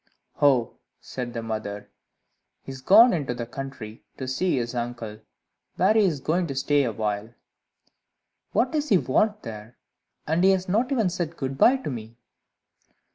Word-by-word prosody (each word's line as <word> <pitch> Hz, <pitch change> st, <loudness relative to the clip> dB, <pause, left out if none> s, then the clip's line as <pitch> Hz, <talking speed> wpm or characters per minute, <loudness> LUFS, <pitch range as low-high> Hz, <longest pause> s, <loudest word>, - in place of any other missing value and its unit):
"Oh," 135 Hz, -5 st, +3 dB, 0.2 s
said 125 Hz, -2 st, -6 dB
the 115 Hz, -, -3 dB
mother, 105 Hz, -2 st, -5 dB, 0.7 s
"he -, -, -8 dB
is 130 Hz, -1 st, -9 dB
gone 215 Hz, -, +7 dB
into 140 Hz, -7 st, -2 dB
the 120 Hz, -1 st, -4 dB
country, 120 Hz, -3 st, -8 dB
to 130 Hz, -, -5 dB
see 140 Hz, +5 st, 0 dB
his 120 Hz, -1 st, -2 dB
uncle, 120 Hz, -3 st, -5 dB, 0.6 s
where 190 Hz, +4 st, +3 dB
he 220 Hz, -, +4 dB
is 160 Hz, -7 st, 0 dB
going 170 Hz, +5 st, 0 dB
to 135 Hz, -, -5 dB
stay 145 Hz, +1 st, +2 dB
awhile." 110 Hz, 0 st, -3 dB, 1.2 s
"What 255 Hz, -, +1 dB
does 300 Hz, -1 st, -1 dB
he 195 Hz, -, +6 dB
want 210 Hz, +8 st, +1 dB
there? 110 Hz, +1 st, -9 dB, 0.5 s
And 160 Hz, +3 st, +1 dB
he 190 Hz, -, +6 dB
has 185 Hz, -1 st, -2 dB
not 225 Hz, +8 st, +1 dB
even 225 Hz, -9 st, +1 dB
said 170 Hz, -2 st, -4 dB
good 135 Hz, -1 st, -3 dB
bye 250 Hz, -, +5 dB
to 260 Hz, -, -5 dB
me!" 115 Hz, -1 st, -8 dB
135 Hz, 165 wpm, -25 LUFS, 115-185 Hz, 1.2 s, gone